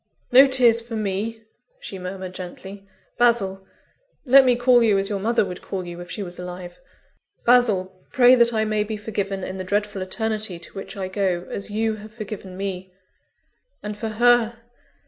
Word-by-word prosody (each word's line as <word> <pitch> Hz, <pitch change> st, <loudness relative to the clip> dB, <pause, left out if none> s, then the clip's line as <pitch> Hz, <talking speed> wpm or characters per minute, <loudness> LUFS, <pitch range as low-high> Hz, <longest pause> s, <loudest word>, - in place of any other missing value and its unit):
"No 265 Hz, +3 st, +8 dB
tears 245 Hz, -3 st, +5 dB
for 230 Hz, 0 st, -8 dB
me!" 215 Hz, +2 st, -3 dB, 0.4 s
she 195 Hz, -, -8 dB
murmured 185 Hz, 0 st, -6 dB
gently. 190 Hz, +2 st, -9 dB, 0.3 s
"Basil! 195 Hz, -6 st, +2 dB, 0.6 s
let 270 Hz, +1 st, +7 dB
me 250 Hz, -1 st, +4 dB
call 245 Hz, 0 st, +4 dB
you 215 Hz, -4 st, +3 dB
as 195 Hz, 0 st, -1 dB
your 200 Hz, -2 st, -2 dB
mother 225 Hz, +1 st, +1 dB
would 180 Hz, -1 st, -7 dB
call 185 Hz, -2 st, -5 dB
you 175 Hz, 0 st, -8 dB
if 175 Hz, -, -10 dB
she 205 Hz, -, -5 dB
was 175 Hz, -1 st, -7 dB
alive 180 Hz, 0 st, -8 dB, 0.7 s
Basil! 195 Hz, -7 st, +2 dB
pray 250 Hz, -2 st, +6 dB
that 235 Hz, -2 st, +5 dB
I 220 Hz, -1 st, 0 dB
may 215 Hz, -1 st, 0 dB
be 215 Hz, 0 st, -5 dB
forgiven 200 Hz, -2 st, -4 dB
in 185 Hz, +1 st, -5 dB
the 185 Hz, -, -4 dB
dreadful 205 Hz, +1 st, -2 dB
Eternity 215 Hz, 0 st, -3 dB
to 170 Hz, -, -11 dB
which 195 Hz, 0 st, -8 dB
I 190 Hz, -1 st, -3 dB
go, 185 Hz, -2 st, -1 dB
as 200 Hz, -, -4 dB
you 220 Hz, +1 st, -1 dB
have 215 Hz, +1 st, -12 dB
forgiven 200 Hz, -4 st, -8 dB
me! 190 Hz, -1 st, -5 dB, 0.9 s
And, 210 Hz, 0 st, -5 dB
for 220 Hz, +1 st, -4 dB
_her? 235 Hz, +1 st, +3 dB
205 Hz, 180 wpm, -23 LUFS, 190-230 Hz, 0.9 s, No